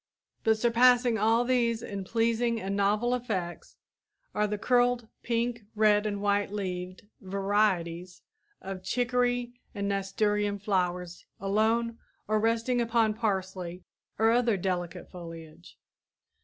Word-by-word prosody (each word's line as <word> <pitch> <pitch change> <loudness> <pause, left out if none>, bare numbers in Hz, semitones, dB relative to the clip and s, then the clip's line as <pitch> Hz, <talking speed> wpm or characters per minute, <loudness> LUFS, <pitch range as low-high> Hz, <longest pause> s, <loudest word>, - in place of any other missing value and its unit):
But 220 -1 +3
surpassing 240 0 +4
all 225 +3 +3
these 235 -2 +1
in 200 -1 -5
pleasing 230 +2 +1
and 195 -1 -3
novel 210 +5 +2
effects 195 -9 -4 0.6
are 210 0 +1
the 210 0 -2
curled, 245 +1 +2
pink, 235 0 -1
red 210 0 +4
and 205 -1 -2
white 205 -1 +1
leaved 185 -2 -4 0.2
varieties 190 -3 -1 0.4
of 190 -1 -6
chicory 245 +3 0
and 200 0 -2
nasturtium 205 +1 0
flowers 180 -3 -2
alone 225 +4 +1 0.3
or 215 0 +2
resting 230 +3 +1
upon 230 -2 +2
parsley 190 -5 -3 0.3
or 225 +1 +4
other 235 -3 +3
delicate 180 -2 -3
foliage. 165 - -11
210 Hz, 115 wpm, -29 LUFS, 190-235 Hz, 0.6 s, surpassing